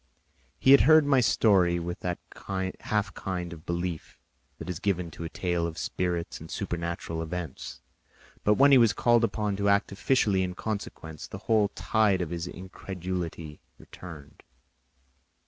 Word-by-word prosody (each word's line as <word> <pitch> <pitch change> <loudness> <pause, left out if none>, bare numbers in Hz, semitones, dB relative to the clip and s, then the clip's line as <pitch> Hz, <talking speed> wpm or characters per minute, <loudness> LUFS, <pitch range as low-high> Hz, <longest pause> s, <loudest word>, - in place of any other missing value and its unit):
He 130 - +4
had 140 - +9
heard 155 -1 +6
my 140 -2 +4
story 95 -6 +3
with 85 +1 -4
that 90 -1 -2 0.6
half 105 -1 -1
kind 90 -3 -4
of 80 0 -13
belief 85 -1 -4 0.4
that 80 - -8
is 90 -3 -4
given 90 -4 -1
to 85 - -8
a - - -4
tale 85 -1 -1
of 80 -1 -7
spirits 90 -2 -2
and 80 - -10
supernatural 85 -1 -3
events; 80 -3 -6 0.6
but 105 - +4
when 140 +4 +6
he 135 - +8
was 115 -2 +5
called 120 -1 +3
upon 105 -3 0
to 100 0 +1
act 100 0 +2
officially 100 -2 +2
in 90 -1 -2
consequence, 90 -8 -5
the - - -7
whole 110 -3 +3
tide 100 -4 +2
of 85 - -6
his 85 0 -3
incredulity 90 -4 -6 0.2
returned. 80 -6 -12
90 Hz, 155 wpm, -28 LUFS, 85-105 Hz, 0.6 s, had